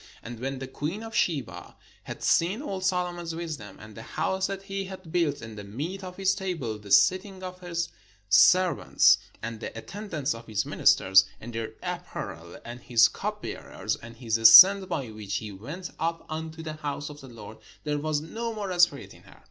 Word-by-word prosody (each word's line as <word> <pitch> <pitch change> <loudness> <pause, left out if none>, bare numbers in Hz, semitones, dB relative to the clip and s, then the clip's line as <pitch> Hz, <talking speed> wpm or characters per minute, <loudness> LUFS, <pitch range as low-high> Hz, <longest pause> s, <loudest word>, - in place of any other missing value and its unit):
And 115 0 -8
when 135 +2 -3
the 135 - -6
queen 160 +11 -4
of 225 0 -8
Sheba 145 -9 -2 0.3
had - - -8
seen 190 - +2
all 195 -9 -4
Solomon's 175 -3 -1
wisdom, 155 - -6
and 110 0 -12
the 110 - -10
house 190 +10 -1
that 195 0 -5
he 195 0 -4
had 185 -3 -10
built, 165 -7 0
and 110 -1 -9
the 105 - -8
meat 155 - -5
of 180 -1 -8
his 195 0 +2
table, 180 - -3
and 105 - -10
the 105 - -12
sit 185 - +5
ting 190 -2 -12
of 180 0 -7
his 170 -2 -3 0.4
servants, 180 - +5 0.2
and 115 -1 -5
the 115 - -7
attendance 160 - -4
of 115 0 -11
his 105 -2 -1
ministers, 95 0 +4
and 120 +2 -9
their 115 -1 -4
apparel, 80 +1 -6
and 120 +1 -8
his 115 -2 +5
cupbearers, - - -4
and 115 0 -12
his 115 -2 -1
ascent 185 - +9
by 135 -9 -3
which 105 -2 -6
he 105 -2 -4
went 150 - -8
up 165 +1 -2
unto 160 +1 -6
the 155 -1 -5
house 145 0 -5
of 145 - -12
the 135 - -11
Lord; 110 -2 -11 0.2
there 150 -1 -1
was 150 0 -1
no 230 +8 -5
more 200 -3 -3
spirit 175 -5 +3
in - - -17
her. - - -18
155 Hz, 195 wpm, -27 LUFS, 115-185 Hz, 0.4 s, ascent